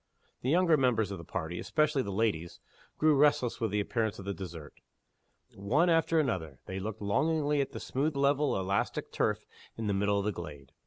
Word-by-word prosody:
The 125 - -1
younger 170 0 +4
members 115 -6 +2
of 95 - -5
the - - -8
party 85 0 -4
especially 150 -2 +1
the 100 - -4
ladies 95 -5 -1 0.4
grew 155 -1 +4
restless 140 -5 +3
with 115 - +1
the 105 +1 0
appearance 110 0 -1
of 95 - -9
the 100 - -2
dessert. 85 -6 -8 0.8
One 140 - +2
after 165 0 +3
another 80 - -1
they 95 0 -5
looked 105 +2 -5
longingly 150 +7 +1
at 135 - -3
the - - -6
smooth 145 +3 -1
level 140 +1 +2
of 95 - 0
elastic 100 +1 -1
turf - - 0 0.3
in 115 - -3
the 105 - +1
middle 100 +1 +1
of 100 - -1
the 105 - +1
glade. 75 -7 -9
110 Hz, 200 wpm, -30 LUFS, 95-145 Hz, 0.8 s, younger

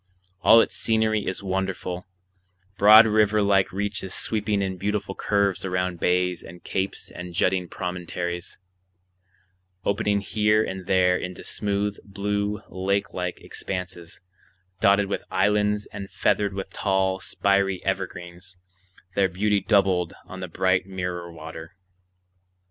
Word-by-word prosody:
All 115 +1 +8
its - - -2
scenery 110 -2 +1
is 95 +2 -3
wonderful—broad 95 +2 +2
river 105 -1 +3
like 100 -1 +3
reaches 100 0 -2
sweeping 105 -2 0
in 95 -1 -3
beautiful 100 +1 -2
curves 100 -2 0
around 90 -2 -1
bays 90 0 +1
and 85 +1 -12
capes 95 +1 -3
and 90 -1 -8
jutting 90 0 +1
promontories, 90 -1 -4 1.3
opening 100 0 +1
here 105 +1 +2
and 95 -3 -6
there 90 -1 +4
into 90 0 -6
smooth, 100 0 -1
blue, 105 +1 -2
lake 95 +2 -1
like 90 -1 -4
expanses 90 -2 -6 0.6
dotted 100 +1 +4
with 100 - -3
islands 105 +2 +1
and 100 -1 -6
feathered 100 0 +1
with 95 -1 -5
tall, 95 -1 0
spiry 95 0 0
evergreens, 90 -1 -4 0.6
their 95 -1 +2
beauty 100 +3 +1
doubled 95 -4 +2
on 95 - -9
the 90 - -4
bright 95 +2 +1
mirror 90 -2 -4
water. 80 +2 -9
95 Hz, 120 wpm, -25 LUFS, 90-100 Hz, 1.3 s, All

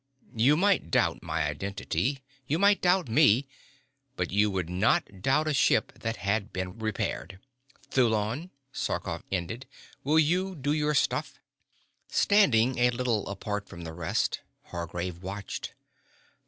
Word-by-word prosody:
You 130 +7 +4
might 195 - +2
doubt - - +1
my - - -1
identity, 100 - -2 0.2
you 150 - +1
might 200 +2 +4
doubt 180 0 +3
me, 130 +1 +4 0.7
but 90 -1 -2
you 105 +2 +3
would 95 -4 -2
not 95 +1 +1
doubt 150 +8 +2
a 155 - +1
ship 135 - +3
that 115 0 -2
had 100 +2 -1
been 95 +3 -5
repaired. 95 -4 -3 0.5
Thulon," 115 - +1 0.2
Sarkoff - - -3
ended, 100 +8 -3 0.4
"will 150 +3 +2
you 180 +5 +2
do 145 -1 -1
your 150 0 +1
stuff?" - - 0 0.7
Standing 130 - +3
a 120 0 +5
little 120 -3 -1
apart 100 +1 -4
from 85 - -9
the 80 -1 -7
rest 80 -1 -1 0.3
Hargraves 85 +1 -4
watched. 100 +1 -6
110 Hz, 135 wpm, -28 LUFS, 95-145 Hz, 0.7 s, a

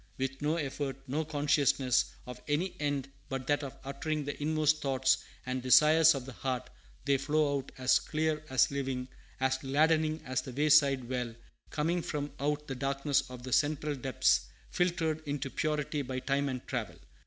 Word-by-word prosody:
With 135 +1 -3
no 150 +2 +1
effort, 140 -3 -3
no 150 +5 -1
consciousness 145 -4 +2 0.2
of 125 -1 -9
any 155 +6 0
end 145 -2 -1 0.2
but 135 -1 -3
that 145 +2 +1
of 135 - -7
uttering 145 +2 -3
the 145 +1 -5
inmost 155 0 +2
thoughts 135 -1 +2 0.3
and 130 0 -2
desires 155 +5 +6
of 130 -2 -5
the 135 - -8
heart, 130 0 -3 0.3
they 140 -1 +3
flow 145 +1 +1
out 135 - -10
as 130 0 +4
clear, 155 0 -1
as 130 0 +3
living, 130 -2 -3 0.3
as 130 0 +1
gladdening 155 +3 +2
as 130 0 -1
the 130 - -8
wayside 140 -3 +4
well, 125 -2 -3 0.3
coming 165 +4 0
from 145 -2 -3
out 150 +1 -1
the 135 - -3
darkness 140 +2 0
of 125 -1 -9
the 130 -1 -4
central 150 +1 +1
depths, 135 -1 +1 0.2
filtered 165 -3 0
into 140 -2 -3
purity 150 -1 -1
by 130 -1 -4
time 140 +2 0
and 130 -2 -5
travel. - - -3
140 Hz, 170 wpm, -31 LUFS, 130-150 Hz, 0.3 s, desires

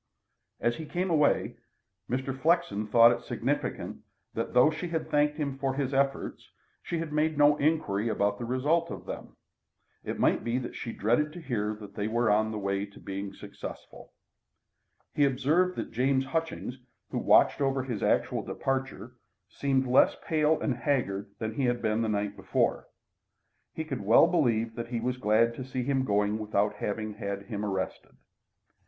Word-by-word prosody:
As 120 +1 0
he 160 - -7
came 180 +2 -1
away, 150 -3 +2 0.5
Mr. 130 +1 -2
Flexen 135 - +1
thought 115 +2 +7
it 120 - -2
significant - - -3 0.3
that, - - -4
though 125 +5 +6
she 160 +3 -4
had 165 -2 -3
thanked 150 0 +2
him 140 -3 -3
for 135 -1 -1
his 135 -1 -1
efforts, 135 0 -1 0.3
she 170 - -3
had 160 -2 -4
made 155 0 +1
no 145 0 +6
inquiry 140 -9 +1
about 100 -1 0
the 120 - -3
result 145 +8 +1
of - - -7
them. - - -8 0.7
It - - -4
might - - +2
be 120 +1 0
that 125 -2 -4
she 115 - -5
dreaded 120 +10 +1
to 175 - -8
hear 110 -9 -2
that 105 -1 -11
they 105 +1 -2
were 120 0 +2
on 110 +1 +3
the 110 - -4
way 100 0 -1
to 100 - -16
be 100 0 -5
successful. - - -10 1.0
He 145 - +2
observed 145 +7 +2
that - - -5
James 130 +2 +1
Hutchings, 135 -3 -3 0.3
who - - -1
watched - - +4
over 135 -1 +1
his 120 -5 -4
actual - - +1
departure, 130 -2 -3 0.3
seemed 135 +1 0
less 130 +1 +4
pale 155 0 +2
and 130 -5 -1
haggard 115 -6 -1
than 110 -1 -3
he 130 +3 0
had 120 0 +1
been 110 0 0
the 110 - 0
night 105 -1 -1
before. - - 0 0.8
He 160 - -4
could 135 -7 -4
well 105 +9 +6
believe 120 -10 +1
that 115 +1 -5
he 120 -1 -2
was 125 +2 -2
glad 115 0 +3
to 130 - -6
see 130 -1 -3
him 135 0 0
going 105 0 +1
without 105 -1 0
having 110 +1 -3
had 100 -1 -4
him 105 0 -5
arrested. 95 -2 -4
125 Hz, 175 wpm, -29 LUFS, 110-145 Hz, 1.0 s, thought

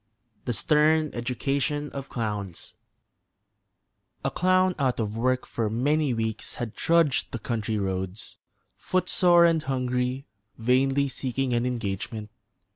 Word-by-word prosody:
THE 120 - 0
STERN 155 +4 +3
EDUCATION 140 +4 -1
OF 140 -1 -7
CLOWNS 105 -6 -4 1.5
A - - +1
clown 185 0 +3
out 130 -3 +1
of 105 -1 -2
work 130 +2 +1
for 115 -2 -2
many 145 +6 +1
weeks 110 -2 -3
had 120 -3 -4
trudged 165 -5 +2
the - - -3
country 110 -1 -2
roads, 95 0 -4 0.4
footsore 180 -1 +3
and 165 -2 +3
hungry, 125 -1 -1 0.3
vainly 135 +4 +2
seeking 130 -1 -2
an 120 +1 +1
engagement. 105 -2 -4
125 Hz, 120 wpm, -26 LUFS, 115-145 Hz, 1.5 s, STERN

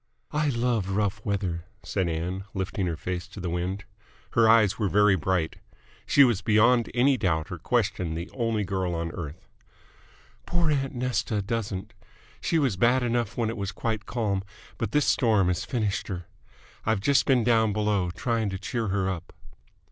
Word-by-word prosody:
"I 150 0 +1
love 120 -6 0
rough 100 0 -1
weather," 95 -4 -2 0.2
said 95 -4 -1
Ann, 90 +4 -3
lifting 95 0 -2
her 85 -2 -2
face 90 +1 -4
to 100 - -11
the 90 -2 -3
wind. 90 +3 -3 0.5
Her 115 -1 +4
eyes 110 -3 +5
were 105 -3 +1
very 105 0 +5
bright. 85 -1 -1 0.5
She 140 - +7
was 120 -7 +3
beyond 115 +2 +4
any 130 +2 +4
doubt 80 -7 0
or - - -5
question 85 -3 0
the 85 +2 -4
only 115 -4 0
girl 95 -2 -1
on 85 0 -3
earth. 85 0 -7 1.0
"Poor 170 -3 +1
aunt 135 -1 -1
Nesta 125 -3 -1
doesn't. 105 -1 -3 0.5
She 165 - +1
was 135 -11 +1
bad 125 +5 +3
enough 120 -2 -1
when 115 -2 0
it 115 - -6
was 100 -1 -3
quite 110 +2 -3
calm, 105 -5 -1 0.4
but - - -2
this 150 -1 +3
storm 110 -8 +3
has 90 - -1
finished 110 -6 -1
her. 90 -3 -5 0.6
I've 110 -2 +1
just 135 +7 +3
been 130 -3 +4
down 110 -2 +3
below, 105 -3 +1
trying 110 +4 -1
to 95 - -3
cheer 115 +3 -3
her 95 -1 0
up." 90 -3 -4
105 Hz, 175 wpm, -27 LUFS, 95-120 Hz, 1.0 s, She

